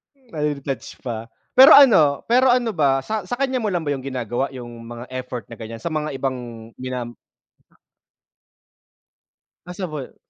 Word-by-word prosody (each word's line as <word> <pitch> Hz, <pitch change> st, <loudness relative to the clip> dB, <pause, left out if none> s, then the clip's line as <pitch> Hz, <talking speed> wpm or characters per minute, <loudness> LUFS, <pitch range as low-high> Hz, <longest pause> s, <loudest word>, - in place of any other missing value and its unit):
Nade-detach 150 Hz, -, -5 dB
pa. 120 Hz, -4 st, -3 dB, 0.4 s
Pero 265 Hz, +2 st, +10 dB
ano 165 Hz, -, +6 dB
pero 250 Hz, +1 st, +5 dB
ano 245 Hz, -2 st, +1 dB
ba 140 Hz, -9 st, +2 dB
sa 215 Hz, +7 st, -4 dB
sa 185 Hz, -, -6 dB
kanya 265 Hz, +1 st, 0 dB
mo 220 Hz, -4 st, -1 dB
lang 175 Hz, -, 0 dB
ba 155 Hz, -, -4 dB
yun 130 Hz, -, -8 dB
ginagawa, 130 Hz, 0 st, -3 dB
yung 125 Hz, -2 st, -8 dB, 0.2 s
mga 120 Hz, +1 st, -8 dB
effort 125 Hz, -3 st, -6 dB
na 115 Hz, -, -10 dB
ganiyan, 115 Hz, 0 st, -8 dB
sa 170 Hz, -, -3 dB
mga 155 Hz, -2 st, -3 dB
ibang 125 Hz, -4 st, -5 dB
ginam 125 Hz, -2 st, -5 dB, 2.5 s
Possible. 175 Hz, -6 st, -6 dB
140 Hz, 145 wpm, -22 LUFS, 125-195 Hz, 2.5 s, Pero